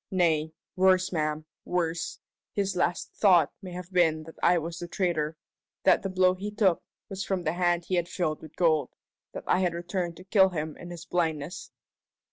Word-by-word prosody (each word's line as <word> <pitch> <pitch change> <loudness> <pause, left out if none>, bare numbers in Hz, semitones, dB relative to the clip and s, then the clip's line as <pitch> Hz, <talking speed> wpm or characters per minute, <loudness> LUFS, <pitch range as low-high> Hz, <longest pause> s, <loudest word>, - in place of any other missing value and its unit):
Nay 160 -4 +2 0.2
worse, 185 0 +4
ma'am, 155 -2 -1 0.2
worse 170 -2 -2 0.4
his 195 -2 -1
last 180 0 -1
thought 180 -7 +5
may 185 -2 -8
have 180 +1 -8
been 160 -3 +3
that 160 +1 -11
I 180 - +5
was 165 +1 -4
the 175 - -5
traitor 165 -4 -1 0.5
that - - +5
the 195 - -3
blow 185 0 +4
he 195 +3 -5
took 205 -4 +2 0.3
was 195 -1 -4
from 190 -2 -2
the 155 - 0
hand 175 -1 +1
he - - -4
had 175 -1 +1
filled 155 -4 -2
with 155 -1 -12
gold 160 -4 +2 0.4
that - - -6
I - - +2
had 180 -2 +1
returned 175 0 -3
to 185 - -11
kill 190 0 +5
him 155 -3 -4
in 175 - -9
his 175 -1 -8
blindness!" 165 0 -2
175 Hz, 190 wpm, -28 LUFS, 160-185 Hz, 0.5 s, thought